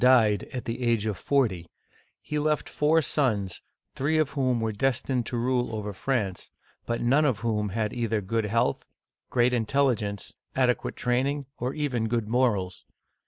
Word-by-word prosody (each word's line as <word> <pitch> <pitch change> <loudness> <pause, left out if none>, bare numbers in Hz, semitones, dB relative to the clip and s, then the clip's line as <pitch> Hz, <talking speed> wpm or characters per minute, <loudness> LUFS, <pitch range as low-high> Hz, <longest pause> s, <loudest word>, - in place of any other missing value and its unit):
died, 115 -5 +5
at 125 - -5
the 115 +2 -4
age 115 -3 +1
of 105 -2 -1
forty, 95 -7 0 0.5
he 150 - -2
left 150 0 0
four 155 +2 +2
sons, 105 -11 0 0.3
three 150 +4 0
of 155 -3 +2
whom 130 -3 +1
were 110 -1 0
destined 125 +2 0
to 120 - -2
rule 125 -1 0
over 105 -1 -4
France, 100 -4 -2 0.4
but 115 - -1
none 135 +6 +3
of 130 -8 +1
whom 105 -3 0
had 105 +1 -1
either 115 -2 0
good 110 +3 -1
health, 115 +3 +1 0.5
great 125 0 +3
intel 130 +3 +3
ligence, 100 -2 -5 0.2
adequate 125 -2 +1
training, 135 +4 0
or 125 +2 -2
even 130 -7 -1
good 115 -1 -1
morals. 110 -6 +1
120 Hz, 165 wpm, -27 LUFS, 110-130 Hz, 0.5 s, died